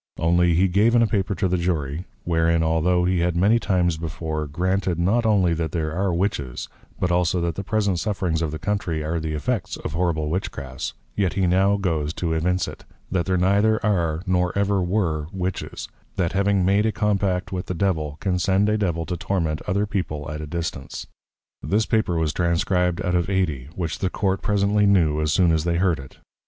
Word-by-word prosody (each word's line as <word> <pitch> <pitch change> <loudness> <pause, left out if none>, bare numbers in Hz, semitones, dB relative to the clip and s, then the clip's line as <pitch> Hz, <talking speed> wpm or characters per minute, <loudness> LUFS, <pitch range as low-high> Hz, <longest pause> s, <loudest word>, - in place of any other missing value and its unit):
Only 85 +1 +3
he 95 +3 +4
gave 105 +6 +3
in 115 - +5
a - - +5
Paper 100 -3 -1
to 90 +2 0
the 90 0 0
Jury; 80 -2 -2 0.2
wherein, 85 -1 +2
altho' 85 +2 +2
he 90 -1 +1
had 85 0 +1
many 105 +6 +4
times 90 -6 +1
before, 80 -1 -4
granted, 90 +3 0
not 110 +7 +2
only 95 -5 +3
that 80 0 -2
there 80 -3 -1
are 95 +2 0
Witches, 85 - -2 0.3
but 90 - 0
also, 90 0 +2
that 85 -1 -1
the 100 - -5
present 100 -3 0
Sufferings 95 -6 -1
of 80 - 0
the 80 - -4
Country 85 -3 -2
are 80 +2 -1
the 80 -1 -3
effects 75 -2 -2
of 75 - -6
horrible 80 -3 0
Witchcrafts, 70 -7 -4 0.2
yet 95 -3 +1
he 95 -1 +1
now 95 +3 +3
goes 80 -5 -1
to 85 -2 -1
evince 90 +2 0
it, - - -9 0.3
_That 85 -2 0
there 95 -1 +1
neither 100 +4 +3
are, 85 -5 +1
nor 90 -2 +1
ever 100 -1 +2
were 90 -5 0
Witches, 95 -1 -4 0.3
that 85 -3 0
having 100 -1 +2
made 100 +3 +3
a - - +1
Compact 100 -4 0
with 90 -1 -4
the 90 - -3
Devil, 80 -5 -1
can 90 -2 0
send 95 +3 +2
a 105 0 +1
Devil 85 -5 -1
to 90 - -3
Torment 85 -3 -1
other 100 +3 +1
people 75 -8 -3
at 75 0 -5
a 75 - -6
distance._ 80 -3 -5 0.6
This 105 +10 +1
Paper 105 -6 +1
was 80 -2 0
Transcribed 90 0 +1
out 90 - 0
of 90 +1 +1
Ady; 80 -10 -1
which 85 -4 -3
the 95 - 0
Court 95 +1 -1
presently 105 0 +2
knew, 80 -6 +3
as 75 0 +1
soon 90 -1 +4
as 80 -1 +1
they 85 0 0
heard 85 -4 +2
it. 70 -1 -12
90 Hz, 205 wpm, -23 LUFS, 80-95 Hz, 0.6 s, in